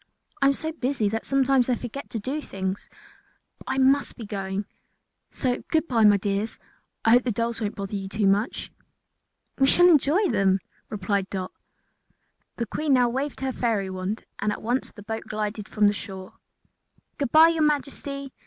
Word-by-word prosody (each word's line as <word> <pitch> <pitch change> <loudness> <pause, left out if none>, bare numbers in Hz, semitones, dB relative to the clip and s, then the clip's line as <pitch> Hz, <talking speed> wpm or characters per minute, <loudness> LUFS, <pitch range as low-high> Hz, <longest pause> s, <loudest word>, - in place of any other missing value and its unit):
I 275 - +5
am 275 - +4
so 315 +2 -3
busy 255 -8 -1
that 225 +2 -3
sometimes 270 -2 +3
I 250 - +3
forget 245 +4 -7
to 225 - -3
do 270 +8 -3
things. 190 -5 -5 0.7
But - - -15
I - - -1
must 270 +2 +3
be 230 - -7
going, 195 -1 -3 0.6
so 250 -2 -1
goodbye 270 -9 +2
my 205 -1 +7
dears; 200 +2 -2 0.5
I 225 - +5
hope 245 +1 +6
the 245 - 0
dolls 230 +2 -2
won't 210 -1 -2
bother 200 +1 -5
you 195 -1 -4
too 210 0 0
much." 200 +5 0 0.9
"We 270 - +5
shall 350 +5 +6
enjoy 340 +4 +4
them," 195 -4 +3 0.3
replied 200 -2 -1
Dot. 185 -2 -4 1.0
The 235 - -2
Queen 300 +4 0
now 250 -2 +4
waved 270 +3 -3
her 265 0 -1
fairy 215 -6 -1
wand 185 +4 -4
and 210 +1 0
at - - -6
once 245 +4 -1
the 205 - -13
boat 220 +1 -5
glided 210 0 -4
from 210 -1 +2
the 205 - +5
shore. 190 -2 -8 0.9
"Good 280 -4 -1
bye, 320 +1 +8
your 330 -1 0
Majesty!" 280 -2 -1
230 Hz, 180 wpm, -25 LUFS, 205-275 Hz, 1.0 s, bye